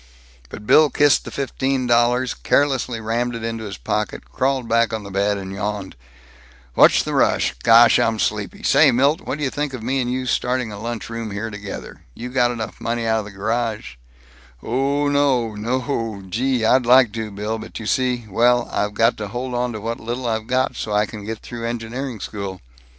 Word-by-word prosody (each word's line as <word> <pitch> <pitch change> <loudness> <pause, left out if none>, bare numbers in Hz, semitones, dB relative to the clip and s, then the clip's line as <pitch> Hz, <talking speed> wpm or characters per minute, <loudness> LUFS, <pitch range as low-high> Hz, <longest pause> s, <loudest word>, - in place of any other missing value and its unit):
But 105 - -9
Bill 155 +6 +6
kissed 145 0 +3
the - - -6
fifteen 135 -1 -1
dollars, 120 +1 +2
carelessly 135 -4 +1
rammed 120 +2 -1
it 115 - -6
into 115 -1 -4
his 100 -3 -6
pocket, - - -3
crawled 130 - 0
back 115 0 +2
on 110 -1 -3
the 100 - -9
bed, 100 +1 +1
yawned, 100 -1 -4 0.8
"What's - - +5
the - - -4
rush? - - +2
Gosh, 115 +1 +6
I'm 115 -1 +1
sleepy. - - -2
Say, - - +5
Milt, 140 +7 +3
whadyuh 140 -5 -3
think 145 -2 -3
of 115 - -8
me 130 +3 0
and 125 0 -2
you 130 0 -2
starting 125 -2 -1
a 100 - -8
lunch 115 0 -4
room 115 -1 -5
here 105 +2 -4
together? 105 -1 -8
You 125 - -6
got 125 -1 +2
enough 115 -3 -5
money 115 0 -2
out 110 0 +2
of 105 - -5
the - - -8
garage 110 - -3 0.3
" 60 -1 -26
"Oh 140 +4 0
no, 140 -5 +2
noooo, 115 -2 -3
gee, 125 +2 0
I'd 125 +1 +3
like 125 -2 +6
to, 110 -1 -4
Bill, 105 +2 -4
but - - -8
you 110 - -7
see, 125 0 0
well, 120 +4 +3
I've 105 0 -1
got 115 +3 +3
to 105 - -4
hold 125 +4 -5
onto 120 -2 -2
what 115 +2 -4
little 120 +3 -4
I've 110 -1 -2
got 130 +1 0
so 105 - -4
I 105 +1 +3
can 105 -1 -9
get 110 +1 -6
through 115 -1 -5
engineering 120 +1 -4
school." 100 -2 -6
115 Hz, 195 wpm, -21 LUFS, 110-125 Hz, 0.8 s, Bill